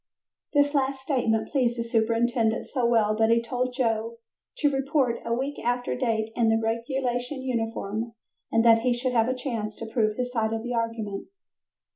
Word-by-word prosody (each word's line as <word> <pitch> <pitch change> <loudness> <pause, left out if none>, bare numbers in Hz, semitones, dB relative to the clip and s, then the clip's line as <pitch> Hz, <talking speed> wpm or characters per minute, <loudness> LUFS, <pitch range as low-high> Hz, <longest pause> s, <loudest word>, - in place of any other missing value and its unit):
This 285 0 +3
last 270 -1 +1
statement 245 -5 0
pleased 245 -4 +1
the 235 - -1
superintendent 230 0 +1
so 250 -4 0
well 220 -3 +3
that 220 0 +3
he 230 0 +5
told 250 +2 -2
Joe 230 -2 0 0.4
to 295 -8 +2
report 270 -3 +1
a - - -4
week 270 +5 -1
after 245 +1 0
date 225 -3 -1
in 230 -2 +3
a 225 - +3
regulation 245 +3 -2
uniform 225 -2 -2 0.4
and 225 +1 +3
that 230 -1 +7
he 245 +1 +1
should 250 +1 -1
have 230 -1 +3
a 255 - 0
chance 230 -5 -3
to 225 - -7
prove 220 -2 0
his 250 0 -2
side 225 -2 0
of 225 0 -3
the 245 +1 -3
argument. 230 -3 -3
235 Hz, 180 wpm, -26 LUFS, 225-255 Hz, 0.4 s, that